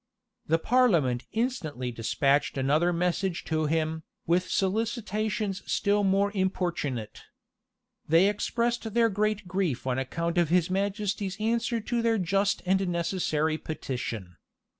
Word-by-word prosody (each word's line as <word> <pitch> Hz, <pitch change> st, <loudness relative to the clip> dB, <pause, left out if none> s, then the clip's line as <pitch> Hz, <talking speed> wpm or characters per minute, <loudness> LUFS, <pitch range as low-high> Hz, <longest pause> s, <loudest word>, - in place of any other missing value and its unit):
[] -, -, -44 dB
The 165 Hz, -, +3 dB
parliament 165 Hz, -, +2 dB
instantly 165 Hz, -, -2 dB
despatched 135 Hz, +6 st, +1 dB
another 150 Hz, +6 st, +2 dB
message 180 Hz, +1 st, -1 dB
to 155 Hz, -1 st, 0 dB
him, 160 Hz, 0 st, 0 dB, 0.2 s
with 180 Hz, +2 st, +1 dB
solicitations 215 Hz, 0 st, -1 dB
still 205 Hz, 0 st, +2 dB
more 195 Hz, +1 st, +2 dB
importunate. 175 Hz, -, -2 dB, 0.9 s
They 165 Hz, +5 st, +5 dB
expressed 230 Hz, +2 st, -1 dB
their 230 Hz, -1 st, +4 dB
great 210 Hz, -1 st, -1 dB
grief 175 Hz, -9 st, -1 dB
on 130 Hz, 0 st, 0 dB
account 170 Hz, +6 st, -1 dB
of 170 Hz, -3 st, +2 dB
his 180 Hz, +1 st, +2 dB
majesty's 200 Hz, 0 st, -1 dB
answer 230 Hz, +2 st, 0 dB
to 235 Hz, +2 st, -1 dB
their 230 Hz, -1 st, +2 dB
just 195 Hz, +2 st, +1 dB
and 190 Hz, +1 st, +2 dB
necessary 165 Hz, -3 st, 0 dB
petition. 115 Hz, -, -5 dB
185 Hz, 125 wpm, -28 LUFS, 155-210 Hz, 0.9 s, They